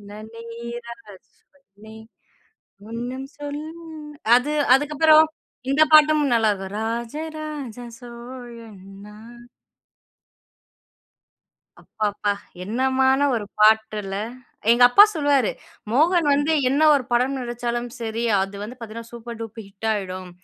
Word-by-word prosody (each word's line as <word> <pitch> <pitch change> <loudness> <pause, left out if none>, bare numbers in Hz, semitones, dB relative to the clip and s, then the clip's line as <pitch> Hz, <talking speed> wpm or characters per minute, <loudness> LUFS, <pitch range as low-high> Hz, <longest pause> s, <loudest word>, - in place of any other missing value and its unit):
"நேரங்கள் 230 0 -9 0.7
நே 220 0 -12 0.9
ஒண்ணு 240 +3 -5 0.2
சொல்லும்", 300 +3 -7 0.5
அது 250 +5 +1 0.2
அதுக்கு 295 +2 -2
அப்புறம் 315 0 +7 0.5
இந்த 300 +3 +5
பாட்டும் 305 0 +6
நல்லா 225 -2 +3
இருக்கும், 195 0 -8
"ராஜராஜ 285 +3 -5 0.2
சோழன் 235 -3 -11 0.3
நான்". 225 +3 -14 2.4
அப்பப்பா! 210 -1 -2 0.3
என்னமான 265 +5 +1
ஒரு 220 -3 -2
பாட்டுல! 215 -2 +2 0.5
எங்க 240 +1 +5
அப்பா 245 +11 +8
சொல்லுவாரு, 285 -6 +2 0.4
"மோகன் 325 +7 +3
வந்து 290 +3 +1 0.2
என்ன 280 +4 +1
ஒரு 280 -3 +2
படம் 255 +3 +1
நடிச்சாலும் 240 -1 -3
சரி. 230 0 -4 0.2
அது 195 +1 -5
வந்து 235 +5 -8
பாத்தீங்கன்னா, 230 0 -9
சூப்பர் 235 -1 -9
டூப் 225 0 -7
ஹிட் 200 +3 -8
ஆகிடும். 185 -3 -4
235 Hz, 105 wpm, -22 LUFS, 220-275 Hz, 2.4 s, அப்பா